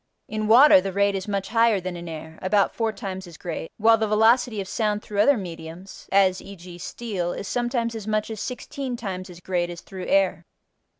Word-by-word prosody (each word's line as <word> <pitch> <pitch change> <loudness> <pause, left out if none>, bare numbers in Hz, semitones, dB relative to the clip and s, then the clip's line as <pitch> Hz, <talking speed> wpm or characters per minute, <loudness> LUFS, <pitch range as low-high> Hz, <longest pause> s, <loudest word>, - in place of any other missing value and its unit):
In 215 0 -3
water 240 -1 +8
the 195 +1 -3
rate 200 +1 +2
is 195 0 -4
much 200 -1 -2
higher 230 -2 +3
than 185 -1 -5
in 170 0 -7
air 160 0 -8
(about 195 +1 +2
four 225 -1 0
times 190 -4 -6
as 170 -3 -12
great) 165 -2 -6
while 225 +1 +5
the 220 - +1
velocity 220 +1 +3
of 195 - -4
sound 210 0 -1
through 205 -1 -4
other 280 +5 +5
mediums 170 0 -9
(as 190 -1 +3
e.g., 180 -3 -11
steel) 185 -5 -4
is 200 - -6
sometimes 240 -1 -1
as 220 -2 -7
much 215 +1 -1
as 215 -2 -5
sixteen 250 +1 -5
times 190 -4 -5
as 175 -1 -11
great 175 -1 -1
as 175 -1 -8
through 185 -1 -8
air. 195 -3 +2
200 Hz, 205 wpm, -24 LUFS, 180-220 Hz, -, water